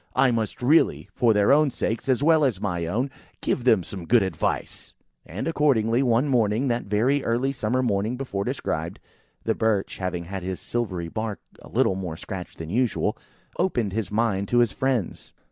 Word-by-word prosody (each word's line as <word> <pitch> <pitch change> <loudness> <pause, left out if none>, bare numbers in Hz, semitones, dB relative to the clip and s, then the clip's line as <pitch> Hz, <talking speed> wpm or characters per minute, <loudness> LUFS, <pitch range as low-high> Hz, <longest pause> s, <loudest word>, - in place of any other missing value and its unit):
I 130 - +4
must 115 +1 -2
really, 150 +6 +3
for 120 -2 +3
their 105 +1 +4
own 150 +1 +5
sakes, 115 0 -3
as 130 +1 +2
well 160 0 +5
as 125 -9 +1
my 85 -5 -2
own, 125 +10 -1 0.3
give 125 - -1
them 110 -7 +4
some 90 -1 -8
good 120 -3 +5
advice." 95 -5 -3 0.3
And 90 - -4
accordingly, 130 -7 +2
one 125 +1 +2
morning,–that 120 0 +1
very 120 +8 +1
early 120 +4 0
summer 130 0 -1
morning 110 +1 0
before 110 -7 -3
described,–the - - -4
Birch, 110 -3 0
having 90 -2 -2
had 95 +2 -6
his 95 0 -4
silvery 95 -8 -3
bark 110 +4 -4 0.2
a - - -13
little - - +2
more 90 -4 -5
scratched 90 -2 -7
than 80 0 -6
usual, 120 +1 +1 0.4
opened 120 - 0
his 110 -1 -2
mind 105 -3 0
to 120 - +1
his 120 -4 +4
friends. 125 -1 -2
115 Hz, 175 wpm, -25 LUFS, 95-125 Hz, 0.4 s, own